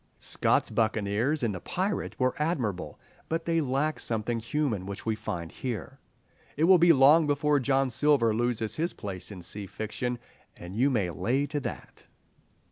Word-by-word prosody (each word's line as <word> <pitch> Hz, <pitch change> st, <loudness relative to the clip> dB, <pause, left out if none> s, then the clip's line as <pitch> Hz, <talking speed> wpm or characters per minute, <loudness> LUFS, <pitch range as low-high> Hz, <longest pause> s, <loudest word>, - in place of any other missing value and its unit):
Scott's -, -, +1 dB
buccaneers 110 Hz, +6 st, 0 dB
in 115 Hz, -, +1 dB
"The 90 Hz, -, -5 dB
Pirate" 190 Hz, -, -2 dB
are 130 Hz, -1 st, +2 dB
admirable, 115 Hz, -, -2 dB, 0.3 s
but 165 Hz, +1 st, -2 dB
they 165 Hz, -1 st, +2 dB
lack 145 Hz, +2 st, 0 dB
something 115 Hz, +1 st, -1 dB
human 115 Hz, -5 st, -2 dB
which 100 Hz, 0 st, -6 dB
we 110 Hz, -1 st, 0 dB
find 85 Hz, -5 st, -5 dB
here. 120 Hz, -6 st, -5 dB, 0.6 s
It 155 Hz, -, +1 dB
will 180 Hz, +1 st, +7 dB
be 170 Hz, 0 st, +7 dB
long 150 Hz, +2 st, +6 dB
before 145 Hz, 0 st, +2 dB
John 135 Hz, 0 st, +1 dB
Silver 120 Hz, -2 st, +3 dB
loses 115 Hz, -1 st, -1 dB
his 165 Hz, +3 st, -1 dB
place 95 Hz, -3 st, -6 dB
in 95 Hz, -4 st, -9 dB
sea 100 Hz, +2 st, -4 dB
fiction, 120 Hz, +5 st, -4 dB, 0.4 s
"and 90 Hz, +2 st, -9 dB
you 130 Hz, +5 st, +3 dB
may 105 Hz, -9 st, 0 dB
lay 120 Hz, -, 0 dB
to 145 Hz, 0 st, -2 dB
that." -, -, -7 dB
125 Hz, 165 wpm, -28 LUFS, 105-150 Hz, 0.6 s, will